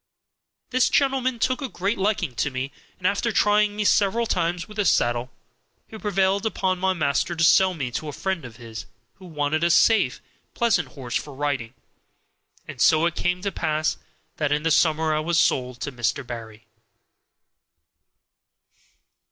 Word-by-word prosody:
This 255 Hz, 0 st, +3 dB
gentleman 265 Hz, -3 st, +1 dB
took 255 Hz, +5 st, 0 dB
a 270 Hz, -, -3 dB
great 195 Hz, +3 st, -2 dB
liking 195 Hz, -, 0 dB
to 125 Hz, -, -1 dB
me, 130 Hz, +1 st, -4 dB, 0.3 s
and 180 Hz, -, -11 dB
after 205 Hz, +4 st, +1 dB
trying 210 Hz, 0 st, +3 dB
me 210 Hz, -, -1 dB
several 210 Hz, +3 st, +2 dB
times 175 Hz, -4 st, -1 dB
with 210 Hz, -, -12 dB
the 205 Hz, -, +1 dB
saddle 120 Hz, -4 st, +1 dB, 0.6 s
he -, -, -12 dB
prevailed 195 Hz, -1 st, +1 dB
upon 190 Hz, -4 st, -1 dB
my 190 Hz, 0 st, +1 dB
master 160 Hz, +1 st, 0 dB
to 165 Hz, -, 0 dB
sell 185 Hz, +2 st, +5 dB
me 130 Hz, -6 st, -4 dB
to 155 Hz, -, -4 dB
a -, -, -4 dB
friend 190 Hz, +3 st, -3 dB
of 120 Hz, -3 st, -10 dB
his, 115 Hz, -1 st, -9 dB, 0.3 s
who 185 Hz, -, -12 dB
wanted 155 Hz, 0 st, -1 dB
a 170 Hz, -, +3 dB
safe, 225 Hz, +6 st, +4 dB, 0.4 s
pleasant 235 Hz, -2 st, +1 dB
horse 125 Hz, -3 st, -5 dB
for 145 Hz, -2 st, -3 dB
riding. 130 Hz, -4 st, -3 dB, 0.9 s
And 125 Hz, -, -7 dB
so 160 Hz, 0 st, +5 dB
it 170 Hz, -, +1 dB
came 180 Hz, +1 st, -1 dB
to 200 Hz, -, -1 dB
pass 155 Hz, -2 st, -1 dB, 0.4 s
that 150 Hz, -2 st, -1 dB
in 150 Hz, +1 st, +1 dB
the 165 Hz, -, +1 dB
summer 155 Hz, 0 st, +3 dB
I 155 Hz, -, +1 dB
was 170 Hz, +2 st, +1 dB
sold 125 Hz, -1 st, +1 dB
to 140 Hz, -, -3 dB
Mr. 125 Hz, +2 st, -2 dB
Barry. 110 Hz, -2 st, -9 dB
170 Hz, 170 wpm, -24 LUFS, 140-200 Hz, 0.9 s, sell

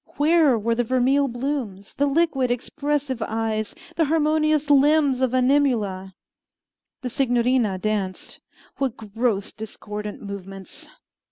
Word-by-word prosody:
Where 300 Hz, -3 st, +4 dB
were 230 Hz, +2 st, 0 dB
the 245 Hz, +1 st, 0 dB
vermeil 260 Hz, +4 st, +2 dB
blooms, 240 Hz, -6 st, -4 dB
the 285 Hz, -, +1 dB
liquid, 280 Hz, -4 st, +1 dB
expressive 270 Hz, +1 st, -2 dB
eyes, 220 Hz, -1 st, -2 dB, 0.2 s
the 325 Hz, -, +3 dB
harmonious 305 Hz, -1 st, +2 dB
limbs 285 Hz, -2 st, +4 dB
of 260 Hz, -2 st, +2 dB
Animula? 240 Hz, -9 st, +1 dB, 0.9 s
The 255 Hz, -, -3 dB
Signorina 245 Hz, -5 st, +1 dB
danced. 195 Hz, -2 st, -3 dB, 0.4 s
What 270 Hz, -4 st, -2 dB
gross, 220 Hz, -1 st, -2 dB
discordant 210 Hz, -1 st, -7 dB
movements! 195 Hz, -2 st, -9 dB
250 Hz, 110 wpm, -23 LUFS, 215-285 Hz, 0.9 s, Where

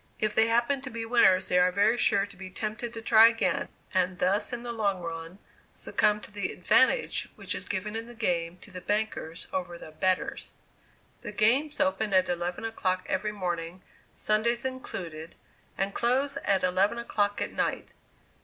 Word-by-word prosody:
If 215 Hz, -1 st, 0 dB
they 220 Hz, 0 st, +4 dB
happen 240 Hz, +4 st, +2 dB
to 265 Hz, -, -6 dB
be 230 Hz, -1 st, -5 dB
winners, 190 Hz, -6 st, +4 dB
they 180 Hz, -, +3 dB
are 180 Hz, 0 st, +4 dB
very 205 Hz, +5 st, +3 dB
sure 200 Hz, -4 st, +2 dB
to 200 Hz, -, -15 dB
be 185 Hz, 0 st, -9 dB
tempted 215 Hz, +6 st, -4 dB
to 225 Hz, -, -6 dB
try 225 Hz, 0 st, +8 dB
again; 230 Hz, 0 st, 0 dB, 0.3 s
and 185 Hz, -1 st, +1 dB
thus 190 Hz, +7 st, +1 dB
in 240 Hz, -1 st, -4 dB
the 240 Hz, -, -4 dB
long 200 Hz, -5 st, -1 dB
run 165 Hz, +2 st, -6 dB, 0.4 s
succumb 210 Hz, 0 st, +1 dB
to -, -, -11 dB
the 205 Hz, -2 st, -3 dB
"advantage" 260 Hz, -, +2 dB
which -, -, -2 dB
is -, -, -5 dB
given 210 Hz, +2 st, -3 dB
in 225 Hz, +1 st, -4 dB
the 240 Hz, -, -10 dB
game 175 Hz, -6 st, -1 dB
to -, -, -13 dB
the 180 Hz, 0 st, -8 dB
bankers 205 Hz, -6 st, -2 dB
over 180 Hz, -2 st, -3 dB
the 155 Hz, -, -11 dB
"betters." 185 Hz, +4 st, -2 dB, 0.7 s
The 235 Hz, -, -6 dB
games 255 Hz, +9 st, +2 dB
open 190 Hz, +2 st, +1 dB
at 185 Hz, 0 st, +3 dB
eleven 175 Hz, +3 st, -2 dB
o'clock 185 Hz, -5 st, -1 dB
every 210 Hz, +3 st, -1 dB
morning, 175 Hz, -2 st, -4 dB, 0.3 s
Sundays 235 Hz, +3 st, +1 dB
included, 170 Hz, -11 st, -6 dB, 0.4 s
and 195 Hz, 0 st, -1 dB
close 265 Hz, +4 st, +1 dB
at 195 Hz, -2 st, +2 dB
eleven 190 Hz, +5 st, +2 dB
o'clock 205 Hz, -3 st, -1 dB
at -, -, -2 dB
night. -, -, -2 dB
205 Hz, 180 wpm, -28 LUFS, 185-230 Hz, 0.7 s, try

